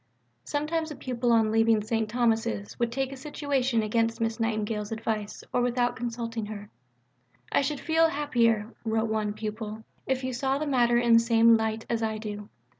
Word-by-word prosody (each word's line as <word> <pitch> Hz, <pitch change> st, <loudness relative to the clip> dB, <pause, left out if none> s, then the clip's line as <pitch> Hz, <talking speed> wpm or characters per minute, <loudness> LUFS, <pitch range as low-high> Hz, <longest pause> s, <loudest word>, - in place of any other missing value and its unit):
Sometimes 315 Hz, +2 st, -1 dB
a 300 Hz, -, -6 dB
pupil 245 Hz, -2 st, -1 dB
on 225 Hz, -2 st, +4 dB
leaving 225 Hz, -1 st, +3 dB
St. 220 Hz, 0 st, -1 dB
Thomas's 220 Hz, -, 0 dB
would 235 Hz, -1 st, 0 dB
take 270 Hz, +1 st, -2 dB
a -, -, -6 dB
situation 265 Hz, -4 st, -1 dB
against 225 Hz, +1 st, 0 dB
Miss 225 Hz, 0 st, -1 dB
Nightingale's 215 Hz, -1 st, -1 dB
advice 220 Hz, -2 st, -3 dB
or 245 Hz, -, +2 dB
without 245 Hz, 0 st, +1 dB
consulting 230 Hz, -2 st, -4 dB
her. 210 Hz, -1 st, -8 dB, 0.8 s
"I -, -, +3 dB
should 280 Hz, +1 st, -2 dB
feel 325 Hz, 0 st, +3 dB
happier," 235 Hz, -7 st, +1 dB
wrote 220 Hz, 0 st, 0 dB
one 215 Hz, -1 st, -1 dB
pupil, 215 Hz, 0 st, -5 dB, 0.2 s
"if 265 Hz, -1 st, 0 dB
you 260 Hz, 0 st, -2 dB
saw 265 Hz, +2 st, 0 dB
the 305 Hz, -, -2 dB
matter 240 Hz, -4 st, +3 dB
in 240 Hz, -1 st, +3 dB
the 230 Hz, -, +8 dB
same 230 Hz, 0 st, +5 dB
light 220 Hz, 0 st, -1 dB
as 230 Hz, -1 st, -1 dB
I 220 Hz, -1 st, -1 dB
do." 210 Hz, -1 st, -6 dB
230 Hz, 180 wpm, -27 LUFS, 220-250 Hz, 0.8 s, the